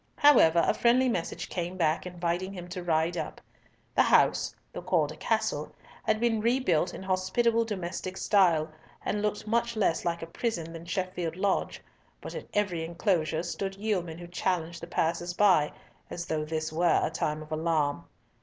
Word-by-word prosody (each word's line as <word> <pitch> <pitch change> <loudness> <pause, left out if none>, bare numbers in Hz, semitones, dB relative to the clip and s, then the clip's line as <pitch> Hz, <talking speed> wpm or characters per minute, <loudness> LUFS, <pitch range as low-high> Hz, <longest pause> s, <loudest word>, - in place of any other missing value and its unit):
However, 170 - +6
a - - +3
friendly 250 +2 +3
message 180 -9 -2
came 175 +1 -4
back, 160 0 +1
inviting 175 +2 -2
him 175 -2 -7
to 180 0 -5
ride 165 0 +1
up. - - -4 0.5
The - - +4
house—though - - +2
called - - +1
a - - -8
castle—had 215 0 -2
been 230 -2 +1
rebuilt 230 -8 +2
in - - -8
hospitable 225 +5 +1
domestic 185 -2 -4
style, 170 -6 +3 0.3
and 205 - -1
looked 210 0 -1
much 235 +1 0
less 195 -6 +1
like 170 -1 -2
a - - -3
prison 165 -2 -3
than 165 0 -8
Sheffield 180 -3 -3
Lodge, 195 +1 -1 0.4
but - - -8
at - - -7
every 185 -6 0
enclosure 165 -1 0
stood 195 +2 -4
yeomen 190 -6 -2
who 175 - -8
challenged 170 -1 -2
the 170 - -7
passers 175 +1 -1
by, 185 -8 +4 0.4
as 175 - -5
though 155 -2 -2
this 155 0 -3
were 170 +2 +3
a - - 0
time 155 -1 -2
of 155 - -16
alarm. 155 -2 0
175 Hz, 165 wpm, -29 LUFS, 165-205 Hz, 0.5 s, However